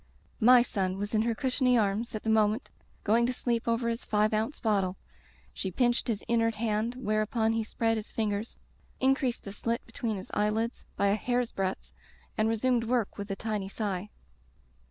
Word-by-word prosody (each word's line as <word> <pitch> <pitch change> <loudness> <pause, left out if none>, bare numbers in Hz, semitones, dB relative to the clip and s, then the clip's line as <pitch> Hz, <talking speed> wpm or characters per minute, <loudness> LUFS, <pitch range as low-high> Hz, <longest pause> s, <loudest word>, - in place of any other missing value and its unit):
My 245 +2 +7
son 190 -5 -2
was 205 +2 -4
in 215 - +3
her 230 0 0
cushiony 255 -1 +2
arms 215 +2 0
at 215 - -4
the 220 - -1
moment 215 +2 +2 0.3
going 230 +3 +3
to 250 - -1
sleep 235 -2 -1
over 230 +1 +1
his 230 0 -2
five 215 0 +2
ounce 220 +7 -1
bottle. 195 -5 +1 0.6
She 190 - -3
pinched 240 +7 +1
his 220 -4 -1
inert 230 -1 +1
hand, 220 +2 -1
whereupon 220 -1 +1
he 225 0 0
spread 225 +1 0
his 215 - -6
fingers, 215 0 -2 0.4
increased 265 -2 +1
the 200 - -7
slit 230 +3 -2
between 230 -2 -3
his 190 - -9
eye 210 0 +2
lids 225 +2 -2
by 200 - +2
a - - +3
hair's 245 +2 0
breadth, 190 -1 -3 0.4
and 215 +1 +2
resumed 230 +1 +1
work 230 -3 0
with 200 +1 -5
a 195 - -1
tiny 210 -2 -3
sigh. 200 -2 -3
225 Hz, 185 wpm, -29 LUFS, 210-235 Hz, 0.6 s, My